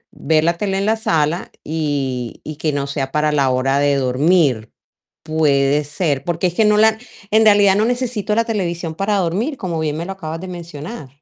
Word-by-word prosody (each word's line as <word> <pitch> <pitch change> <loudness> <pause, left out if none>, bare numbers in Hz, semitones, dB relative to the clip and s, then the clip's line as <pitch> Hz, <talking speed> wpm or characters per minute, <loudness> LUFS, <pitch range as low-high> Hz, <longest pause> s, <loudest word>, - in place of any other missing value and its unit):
ver 155 -1 +1
la 170 +1 +1
tele 195 -2 -1
en 200 - -1
la 220 +1 +2
sala 170 -7 -1
y 140 -6 -3
y, 155 -1 -7
que 155 -1 -1
no 140 -1 -2
sea 140 -1 -3
para 150 0 +1
la 140 -3 +2
hora 135 +2 +1
de 145 0 +2
dormir. 135 -2 +2 0.5
Puede 150 -2 +2
ser, 145 -2 -1
porque 175 +3 -1
es 175 - -6
que 220 +1 +3
no 210 0 +4
la 220 +1 +4 0.3
en 220 +1 +4
realidad, 205 -2 +5
no 215 +2 +2
necesito 240 -4 -1
la 230 +1 +2
televisión 175 -7 -3
para 200 +3 0
dormir, 200 - -1
como 175 -7 -3
bien 155 -1 -2
me 170 - -4
lo 195 - -5
acabas 165 -4 -6
de 185 - -7
mencionar. 170 - -8
165 Hz, 205 wpm, -19 LUFS, 145-200 Hz, 0.5 s, realidad